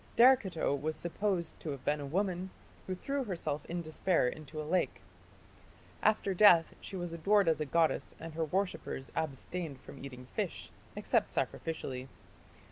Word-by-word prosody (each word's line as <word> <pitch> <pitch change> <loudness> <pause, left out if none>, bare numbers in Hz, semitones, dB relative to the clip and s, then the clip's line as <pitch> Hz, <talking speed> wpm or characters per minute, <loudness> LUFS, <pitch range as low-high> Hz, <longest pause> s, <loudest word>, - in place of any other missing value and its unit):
" - - -26
Derceto 230 - +5
was 155 +3 -2
supposed 175 -1 -1
to 160 - -5
have 140 -3 -5
been 150 0 +2
a 145 - -4
woman 185 +3 -1 0.4
who 185 - -1
threw 275 +8 -2
herself 160 - -2
in 170 0 -3
despair 160 -2 +2
into 155 +3 -6
a 155 - -3
lake. 180 +4 +1 1.0
After 210 -2 +3
death 180 -4 +7
she 195 - -7
was 175 -2 -3
adored 200 +4 +3
as 160 -1 +3
a 150 - -1
goddess 165 +2 +1
and 165 -1 -7
her 160 0 0
worshippers 180 -6 -2
abstained 160 0 -3
from 135 - -11
eating 125 -2 -8
fish, - - -3 0.2
except - - +2
sacrificially. 130 -5 -3
165 Hz, 160 wpm, -33 LUFS, 150-190 Hz, 1.0 s, death